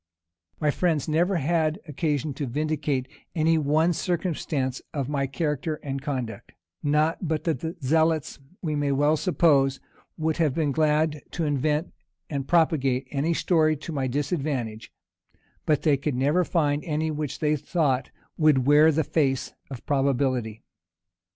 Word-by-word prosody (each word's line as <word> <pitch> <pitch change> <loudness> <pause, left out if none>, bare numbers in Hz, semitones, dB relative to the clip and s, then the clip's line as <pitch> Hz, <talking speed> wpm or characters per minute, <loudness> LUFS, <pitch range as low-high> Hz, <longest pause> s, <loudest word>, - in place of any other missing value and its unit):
My 150 -1 +2
friends 160 -3 0
never 170 +5 +2
had 160 +1 +1
occasion 150 -1 -1
to 140 0 -4
vindicate 145 -1 -1 0.3
any 160 0 +3
one 155 +4 +2
circumstance 155 -7 -2
of 140 -3 -1
my 140 -1 -1
character 150 +1 -2
and 135 -1 -4
conduct; 130 -6 -5 0.3
not 155 +4 +1
but 155 -1 -1
that 160 -7 0
the 160 +5 -4
zealots, 160 +2 +1 0.2
we 155 -3 -1
may 145 -1 0
well 145 +3 +3
suppose, 145 -6 +2 0.4
would 160 0 -1
have 155 -6 +1
been 155 -3 +1
glad 150 +1 +1
to 170 - -1
invent 150 +2 0 0.4
and 140 -2 -3
propagate 140 -6 +2
any 150 +4 0
story 155 -3 +2
to 155 - -7
my 135 -4 -1
disadvantage, 135 - -2 0.8
but 150 -3 +2
they 150 -3 +4
could 140 0 -2
never 145 +8 +2
find 150 -4 0
any 155 0 -1
which 150 -3 -3
they 150 -1 +1
thought 145 -3 0 0.3
would 150 -5 +4
wear 150 +3 +6
the 160 +1 +1
face 135 -4 0 0.2
of 130 -3 -8
probability. 130 -5 0
150 Hz, 145 wpm, -25 LUFS, 135-160 Hz, 0.8 s, wear